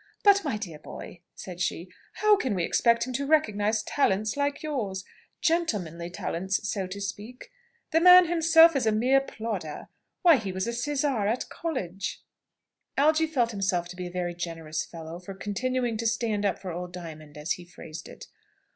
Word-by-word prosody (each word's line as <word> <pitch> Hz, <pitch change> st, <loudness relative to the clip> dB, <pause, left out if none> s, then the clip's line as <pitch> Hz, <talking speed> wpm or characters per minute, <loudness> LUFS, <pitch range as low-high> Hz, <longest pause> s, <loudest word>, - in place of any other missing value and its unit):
"But, 400 Hz, -1 st, +6 dB
my 275 Hz, -9 st, -1 dB
dear 175 Hz, -8 st, -7 dB
boy," 170 Hz, +2 st, -10 dB
said 180 Hz, -1 st, -8 dB
she, 170 Hz, +1 st, -2 dB, 0.2 s
"how 425 Hz, 0 st, +4 dB
can 255 Hz, -, -1 dB
we 180 Hz, -, 0 dB
expect 235 Hz, +5 st, +3 dB
him 255 Hz, -, -5 dB
to 275 Hz, +2 st, -2 dB
recognise 215 Hz, -8 st, +2 dB
talents 215 Hz, -4 st, +1 dB
like 285 Hz, +1 st, -1 dB
yours 215 Hz, -11 st, -3 dB, 0.4 s
gentlemanly 200 Hz, -, 0 dB
talents, 190 Hz, +3 st, -2 dB
so 195 Hz, -3 st, -2 dB
to 190 Hz, +2 st, -7 dB
speak? 205 Hz, +5 st, -7 dB, 0.4 s
The 325 Hz, -, +3 dB
man 360 Hz, +1 st, +9 dB
himself 330 Hz, -1 st, +6 dB
is 255 Hz, -5 st, +1 dB
a -, -, +4 dB
mere 255 Hz, +5 st, +3 dB
plodder. 215 Hz, -, -5 dB, 0.3 s
Why, 335 Hz, -5 st, +7 dB
he 200 Hz, -5 st, -4 dB
was 185 Hz, 0 st, -2 dB
a 235 Hz, -, -2 dB
sizar 270 Hz, -3 st, 0 dB
at 230 Hz, +4 st, -1 dB
college!" 195 Hz, -, -4 dB, 0.7 s
Algy 310 Hz, +3 st, +4 dB
felt 250 Hz, -7 st, +1 dB
himself 190 Hz, -4 st, -1 dB
to 180 Hz, -, -8 dB
be 180 Hz, 0 st, -5 dB
a -, -, -9 dB
very 175 Hz, -1 st, -2 dB
generous 165 Hz, -2 st, -4 dB
fellow 165 Hz, 0 st, -8 dB
for 190 Hz, +2 st, -9 dB
continuing 240 Hz, +4 st, -1 dB
to 230 Hz, +1 st, -1 dB
"stand 220 Hz, -2 st, 0 dB
up 190 Hz, -, -1 dB
for 185 Hz, -2 st, -6 dB
old 175 Hz, +1 st, -5 dB
Diamond," 155 Hz, -4 st, -9 dB
as 150 Hz, +3 st, -4 dB
he 180 Hz, -, -1 dB
phrased 165 Hz, -2 st, -10 dB
it. -, -, -11 dB
210 Hz, 180 wpm, -27 LUFS, 180-270 Hz, 0.7 s, man